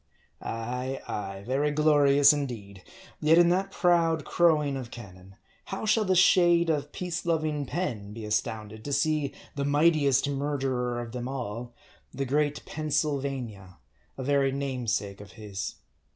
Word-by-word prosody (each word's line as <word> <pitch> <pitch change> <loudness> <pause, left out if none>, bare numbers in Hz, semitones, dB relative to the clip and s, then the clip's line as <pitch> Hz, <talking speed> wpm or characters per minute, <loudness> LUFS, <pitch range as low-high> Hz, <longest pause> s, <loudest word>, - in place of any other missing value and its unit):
Ay, 125 +4 -4
ay, 100 -1 -5
very 135 +5 +1
glorious 145 -1 +5
indeed! 115 -9 -5 0.4
yet 155 +2 +4
in 175 0 +6
that 190 +2 +1
proud 165 -4 +2
crowing 150 -5 +2
of 130 -3 -6
cannon, 95 -5 -12 0.3
how 195 +3 -5
shall 215 +1 +3
the 185 -1 +2
shade 175 -2 +5
of 145 -1 -2
peace 175 -1 -4
loving 155 -4 -1
Penn 115 - -3
be 110 0 -7
astounded, 110 0 -3
to 145 - -4
see 150 -1 +1 0.2
the 140 - -3
mighti 150 +1 +3
est 135 0 +3
murderer 135 -4 -1
of 120 -1 -6
them 125 0 -5
all, 120 -2 -5 0.4
the 135 +1 -3
great 145 +2 0
Pennsylvania, 135 - -3 0.4
a 130 - -4
very 140 0 +2
namesake 125 -7 -2
of 105 - -13
his. 105 -3 -6
140 Hz, 145 wpm, -27 LUFS, 115-155 Hz, 0.4 s, in